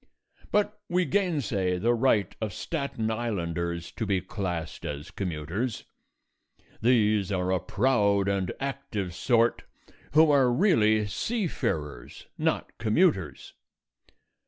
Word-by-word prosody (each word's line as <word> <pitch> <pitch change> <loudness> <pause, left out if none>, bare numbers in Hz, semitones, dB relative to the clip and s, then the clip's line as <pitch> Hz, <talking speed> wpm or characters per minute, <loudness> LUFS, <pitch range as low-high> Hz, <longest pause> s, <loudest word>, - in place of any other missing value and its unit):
But 210 0 +1
we 180 +1 +2
gain 175 -1 +1
say 95 -5 0
the 115 +6 +2
right 115 -6 +2
of 105 -3 -2
Staten 140 -8 -3
Islanders 85 -7 -3
to 110 - -4
be 95 -2 +2
classed 90 -4 -4
as 75 +1 -5
commuters. 90 - -3 1.0
These 110 -4 +3
are 90 -1 0
a 95 - +2
proud 100 0 +2
and 95 -2 0
active 105 -9 -4
sort 115 +4 +2 0.5
who 155 0 +6
are 135 -4 +4
really 110 - +3
seafarers, 100 - -3
not - - -1
commuters. 110 - +1
105 Hz, 110 wpm, -27 LUFS, 90-130 Hz, 1.0 s, who